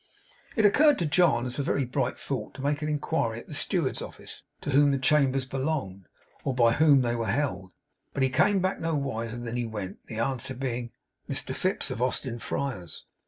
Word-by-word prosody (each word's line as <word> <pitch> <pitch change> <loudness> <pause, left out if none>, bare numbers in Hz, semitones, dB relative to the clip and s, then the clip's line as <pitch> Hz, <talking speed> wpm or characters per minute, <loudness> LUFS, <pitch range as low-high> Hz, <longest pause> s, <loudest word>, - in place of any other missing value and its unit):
It 220 - +3
occurred 290 +7 +6
to 170 - 0
John 150 -6 +3
as 125 +2 -2
a - - +3
very 140 -1 0
bright 125 - -1
thought - - -4
to 135 - -7
make 145 +1 0
inquiry 150 -6 -1
at - - -12
the - - -9
steward's 145 0 0
office, - - -8 0.2
to - - -3
whom 145 +1 +5
the 140 - +2
chambers 135 -1 +3
belonged, 130 - -3 0.4
or 135 - -1
by 120 -2 +5
whom 145 -2 +5
they 120 -1 0
were 115 -1 -2
held; 100 -7 -1 0.4
but 135 - 0
he 130 - +3
came 190 +9 +3
back 185 +1 0
no 165 -1 -1
wiser 115 -5 -3
than 120 0 -4
he 120 -1 -1
went, 105 -4 -6
the 110 - -7
answer 130 +2 -1
being, 120 -2 -3 0.4
'Mr - - -1
Fips, - - 0
of 115 - -4
Austin 125 -1 -1
Friars. 115 - -4
130 Hz, 200 wpm, -27 LUFS, 120-145 Hz, 0.4 s, occurred